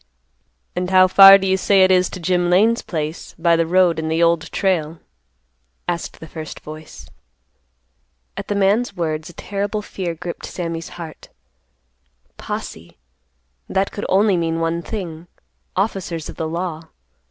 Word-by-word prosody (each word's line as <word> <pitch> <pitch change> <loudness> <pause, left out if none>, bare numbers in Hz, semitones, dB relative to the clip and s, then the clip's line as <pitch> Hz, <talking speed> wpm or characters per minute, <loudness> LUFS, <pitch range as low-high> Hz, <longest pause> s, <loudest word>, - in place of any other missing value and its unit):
"And 180 0 -2
how 185 0 +6
far 195 +1 +10
do 195 - -4
you 190 0 +2
say 195 0 +4
it 185 - +4
is 180 -1 +3
to - - -8
Jim 175 0 +1
Lane's 220 +6 +3
place, 155 -1 -5
by 170 0 +3
the 165 0 +1
road 180 -1 +3
and 160 0 -3
the 165 +1 +2
Old 165 -1 +1
Trail?" 170 -5 0 0.9
asked 170 -1 -4
the 160 - -10
first 155 0 -8
voice. 155 0 -11 1.3
At - - -6
the 205 - -1
man's 200 +5 +1
words 155 -2 -3
a - - -12
terrible 205 +4 -3
fear 180 -4 -4
gripped 170 +1 -7
Sammy's 165 -2 -5
heart. 165 -3 -9 1.1
"Posse," - - -7 0.7
that 195 +1 0
could 205 - -5
mean 190 - +4
only 185 -5 +2
one 165 +1 -1
thing,—officers 175 -1 -5
of - - -8
the 160 - -3
law. 165 -1 -4
175 Hz, 150 wpm, -20 LUFS, 165-190 Hz, 1.3 s, far